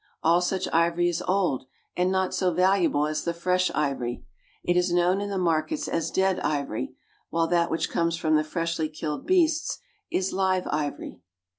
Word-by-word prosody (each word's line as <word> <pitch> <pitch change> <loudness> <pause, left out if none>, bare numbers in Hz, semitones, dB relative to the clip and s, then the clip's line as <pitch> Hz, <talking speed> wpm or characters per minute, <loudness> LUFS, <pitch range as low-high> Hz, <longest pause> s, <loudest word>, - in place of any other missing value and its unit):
All 170 +2 +4
such 185 +1 -1
ivory 170 +1 +3
is 175 0 -2
old, 180 -9 +1 0.3
and 180 +1 +1
not 190 -1 0
so 185 -2 +1
valuable 180 -4 +3
as 155 0 -2
the 170 0 -2
fresh 180 +1 +1
ivory. 130 - -2 0.4
It 175 - +1
is 180 0 +2
known 175 +3 +2
in 205 - -3
the 200 - -2
markets 180 - 0
as 165 - -1
dead 190 -1 +1
ivory, 140 -7 -2 0.3
while 165 0 +1
that 170 -1 +2
which 165 - -1
comes 170 0 0
from 155 -2 +2
the 155 - +3
freshly 165 0 -2
killed 150 -1 -5
beasts 330 -4 +2 0.3
is 190 0 -1
live 185 -1 +1
ivory. 150 -9 -3
175 Hz, 175 wpm, -26 LUFS, 155-185 Hz, 0.4 s, All